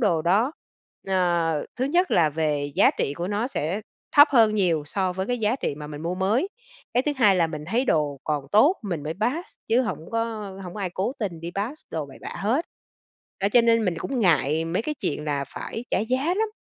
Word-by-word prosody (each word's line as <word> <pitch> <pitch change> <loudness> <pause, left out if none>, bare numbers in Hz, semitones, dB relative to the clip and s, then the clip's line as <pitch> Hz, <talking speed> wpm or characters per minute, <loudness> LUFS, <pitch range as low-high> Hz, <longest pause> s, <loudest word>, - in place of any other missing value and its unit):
đồ 175 -9 +2
đó. 210 - +2 0.6
Ờ, 175 -4 +1
thứ 255 - 0
nhất 350 +7 +2
là 160 -3 +4
về 145 -2 -1
giá - - +6
trị 140 - 0
của 175 +4 -4
nó 210 +4 0
sẽ 185 - -2 0.4
thấp 290 +1 +9
hơn 225 -5 +5
nhiều 175 -7 +2
so 185 +3 -1
với 190 +1 -3
cái 245 +1 -1
giá 220 +3 +1
trị 145 - -2
mà 150 0 -8
mình 150 0 -7
mua 170 +2 -2
mới, 210 - +1 0.5
cái 250 - +3
thứ 295 - +2
hai 210 -7 +5
là 170 -2 +3
mình 155 -2 -6
thấy 230 +10 0
đồ 150 - +1
còn 150 -3 -1
tốt, 290 - +6
mình 175 -8 -3
mới 155 +2 -3
pass 280 +11 -1 0.2
chứ 235 +3 +4
hổng 220 - -3
có 230 0 +1 0.4
hổng 180 +1 -8
có 210 - -6
ai 185 -2 -2
cố 190 +7 -2
tình 185 -7 -3
đi 170 +1 -5
pass 230 +10 -3
đồ 155 -3 -3
bậy 135 - -13
bạ - - -6
hết. 235 +11 0 0.8
Đó, 200 - +3
cho 240 - +6
nên 230 -2 +3
mình 175 -2 0
cũng 265 +6 -3
ngại 160 - +2
mấy 170 +6 -1
cái 305 +5 -3
chuyện 150 +1 -2
là 145 -2 -1
phải 225 +10 -6
trả - - +2
giá 255 +6 0
lắm. 440 +2 +1
190 Hz, 230 wpm, -25 LUFS, 160-235 Hz, 0.8 s, thấp